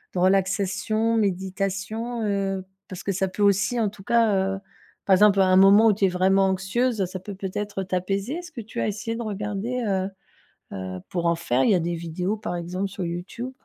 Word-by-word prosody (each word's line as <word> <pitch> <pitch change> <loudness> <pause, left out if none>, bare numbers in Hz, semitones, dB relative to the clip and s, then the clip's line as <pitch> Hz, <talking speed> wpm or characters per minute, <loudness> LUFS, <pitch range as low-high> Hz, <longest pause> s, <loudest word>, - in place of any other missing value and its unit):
de - - 0
relaxation, 195 +4 +1
méditation, 195 +4 -2
heu, 195 -2 -1 0.2
parce 185 0 -7
que 200 - -1
ça 190 +1 0
peut 205 +2 -2
aussi, 205 +4 +3
en 215 - +2
tout 195 -1 -14
cas, 195 -4 +2
heu, - - -7 0.5
par 195 - +4
exemple 200 +1 +5
à 190 - +6
un 185 0 +4
moment 200 +3 +7
où 210 - +5
tu 200 - -4
es - - +3
vraiment 190 +2 +3
anxieuse, 195 +3 0
ça 185 +1 -6
peut 195 +2 -8
peut-être 195 +1 -4
t'apaiser? 195 +5 -2
Est-ce 350 -2 -7
que 285 - -8
tu 220 - -5
as - - 0
essayé 215 +2 -3
de 235 - -4
regarder, 210 +4 -3
heu 190 -1 0 0.7
heu, 95 -1 -5
pour 175 -2 -2
en 170 0 +3
faire? 130 -6 0
Il - - +4
y - - +5
a 180 - +2
des 170 +1 -2
vidéos 175 +5 -3
par 175 -4 -4
exemple 180 +3 -3
sur 195 -1 -5
Youtube. 180 +9 -5
195 Hz, 210 wpm, -24 LUFS, 185-210 Hz, 0.7 s, moment